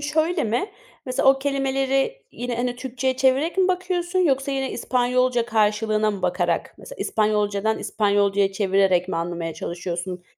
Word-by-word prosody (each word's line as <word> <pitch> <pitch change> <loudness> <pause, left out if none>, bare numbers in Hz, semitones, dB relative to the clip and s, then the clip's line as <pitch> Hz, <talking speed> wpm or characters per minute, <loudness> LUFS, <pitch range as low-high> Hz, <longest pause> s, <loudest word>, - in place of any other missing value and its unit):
şöyle 315 +3 0
mi? 240 - -1 0.4
Mesela, 255 +1 +2
o 270 - +5
kelimeleri 270 - 0
yine, 245 -1 -4
hani, 245 0 -2
Türkçe'ye 260 +1 -2
çevirerek 270 +8 +2
mi 375 0 +4
bakıyorsun 365 0 -1
yoksa 275 -5 +2
yine 270 -1 -1
İspanyolca 250 -1 +1
karşılığına 215 -1 +1
mı 200 -2 -6
bakarak, 175 -2 -1
mesela, - - -11
İspanyolca'dan 210 0 0
İspanyolca'ya 200 -2 +1
çevirerek 190 -2 +2
mi 175 - -2
anlamaya 170 -1 -3
çalışıyorsun? 175 +2 -5
240 Hz, 140 wpm, -23 LUFS, 200-270 Hz, 0.4 s, o